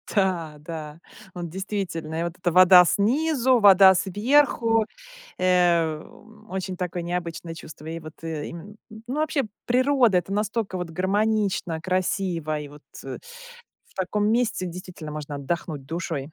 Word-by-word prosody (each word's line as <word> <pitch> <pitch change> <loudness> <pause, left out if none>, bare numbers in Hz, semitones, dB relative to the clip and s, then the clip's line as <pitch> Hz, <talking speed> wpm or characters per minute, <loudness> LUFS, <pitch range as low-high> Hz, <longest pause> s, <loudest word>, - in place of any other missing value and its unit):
Да 175 -6 0
да, 155 0 -8 0.3
вот 175 -2 -5
действительно, 175 -4 -4
и 170 - 0
вот 170 +1 -5
эта 175 -1 -1
вода 180 0 +8
снизу, 255 - +2
вода 195 -2 +8
сверху, 225 +3 +2 0.5
эм, 180 +4 0
очень 190 -1 -4
такое 180 -1 -3
необычное 170 -1 -4
чувство. 155 -1 -11
И 165 +1 -5
вот, 155 -1 -10
и 160 -2 -4
м, 200 +5 -10 0.3
ну 255 - -4
вообще, 305 -2 0 0.2
природа- 250 -5 +3
это 175 +3 -5
настолько 210 -1 -1
вот 180 -2 -4
гармонично, 195 -2 0
красиво, 180 -4 -1
и 145 - -7
вот, 150 +1 -15 0.2
э, - - -6 0.7
в - - -27
таком 205 +3 0
месте 230 -5 0
действительно 175 -3 -8
можно 150 -1 -6
отдохнуть 150 -1 -4
душой. 165 -2 -3
180 Hz, 140 wpm, -24 LUFS, 165-210 Hz, 0.7 s, вода